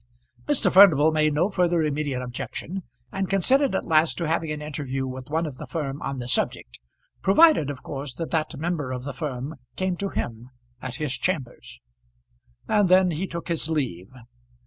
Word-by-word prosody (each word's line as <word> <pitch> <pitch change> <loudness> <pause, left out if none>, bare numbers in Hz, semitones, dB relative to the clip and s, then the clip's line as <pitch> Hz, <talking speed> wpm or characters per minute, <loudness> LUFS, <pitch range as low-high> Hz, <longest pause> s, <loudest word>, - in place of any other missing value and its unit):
Mr. 260 -10 +2
Furnival 160 -6 +7
made 155 -1 +2
no 180 +7 +2
further 175 -3 +2
immediate 145 -4 -2
objection, 155 +9 -5 0.3
and 195 -1 -2
consented 255 - +3
at - - -1
last 160 0 +3
to 170 - -2
having 160 0 0
an 150 0 -3
interview 140 -3 -4
with 130 0 -7
one 160 +2 0
of 145 -5 -6
the - - -8
firm 145 -4 -4
on 135 - -3
the 120 -1 -5
subject, - - -1 0.4
provided, 200 - +5
of 140 -3 -6
course, 135 -3 -6
that 165 - -5
that 155 -2 -1
member 155 -4 -2
of 125 -1 -4
the 140 0 -5
firm 135 +2 -5 0.2
came 185 -1 -1
to 195 +2 -3
him 120 -4 -5 0.3
at 130 -1 -5
his 150 -1 -2
chambers. 125 - -4 0.9
And 205 -3 +3
then 185 0 +5
he 170 +5 -3
took 170 -1 -6
his 165 -2 0
leave. 120 - -2
155 Hz, 180 wpm, -25 LUFS, 135-180 Hz, 0.9 s, Furnival